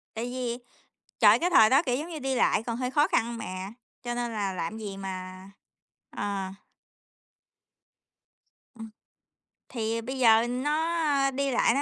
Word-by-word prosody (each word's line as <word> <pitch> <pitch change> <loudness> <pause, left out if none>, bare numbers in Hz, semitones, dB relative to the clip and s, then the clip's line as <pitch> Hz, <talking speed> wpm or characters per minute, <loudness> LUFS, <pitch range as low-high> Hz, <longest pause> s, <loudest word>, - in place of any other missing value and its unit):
Tại 225 +2 -3
vì, 245 -1 -3 0.6
trời, 215 0 +7
cái 355 +5 0
thời 220 -10 +6
đó, 270 +4 +5
kiểu 250 -6 0
giống 305 +5 -5
như, 330 -3 -6
đi 270 -1 -2
lại 230 - +2
còn 230 0 -4
hơi 250 0 -2
khó 295 +3 +3
khăn 235 +1 0
mà, 185 -2 -6 0.3
cho 240 -1 -3
nên 240 -1 -3
là 205 -3 -2
làm 185 +4 -4
gì 205 -3 -6
mà 185 0 -7 0.6
ờ. 200 -2 -3 2.3
Ừm. 225 -1 -9 0.8
Thì 230 -1 -2
bây 260 +3 -5
giờ 225 -1 +5
nó 295 +2 0
đi 275 0 -1
lại 235 - +3
nó 280 - +1
235 Hz, 155 wpm, -27 LUFS, 210-270 Hz, 2.3 s, trời